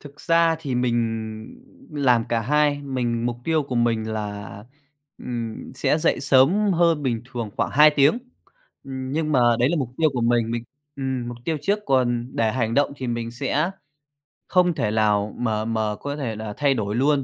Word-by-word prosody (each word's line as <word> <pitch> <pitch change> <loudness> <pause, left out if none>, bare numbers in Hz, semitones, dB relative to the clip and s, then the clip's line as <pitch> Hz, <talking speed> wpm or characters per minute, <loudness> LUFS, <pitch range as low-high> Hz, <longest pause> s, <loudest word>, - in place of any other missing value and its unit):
thực 145 0 -13
ra 165 -1 +3
thì 140 -6 -4
mình 125 -1 +1 1.0
làm 125 -6 +2
cả 115 -1 +1
hai. 145 +4 +1
Mình 120 -4 -2
mục 120 -1 -2
tiêu 160 -2 +1
của 135 -2 -6
mình 115 -2 +1
là, 105 -2 -5 0.6
ừm, 115 -3 -6
sẽ 155 - +1
dậy 160 - +1
sớm 145 +10 +4
hơn 170 -3 +2
bình 120 -4 -1
thường 115 -4 -4
khoảng - - 0
2 150 +2 +7
tiếng. 145 - +3 0.7
Ừm, 130 -1 -6
nhưng 155 0 -1
mà 130 - +4 0.2
đấy 125 +2 +3
là 170 - 0
mục 130 - -2
tiêu 155 -1 +3
của 125 - -2
mình 115 -1 +2
mình 120 0 -3 0.3
ừm, 130 -3 -3
mục 120 - -6
tiêu 160 -2 -1
trước 205 +7 +1
còn 120 -2 +1
để 110 -1 +1
hành 115 -3 -1
động 145 +1 +2
thì 130 - -5
mình 115 -1 -3
sẽ 140 +7 -1 0.8
không 180 -1 +3
thể 105 -7 -1
lào 105 -1 +1
mà 110 -3 -1
mà 110 -2 -1
có 145 +5 -5
thể 130 -7 -3
là 110 -1 -6
thay 140 -2 +3
đổi 105 -3 -2
luôn, 140 +2 +2
125 Hz, 190 wpm, -23 LUFS, 115-145 Hz, 1.0 s, 2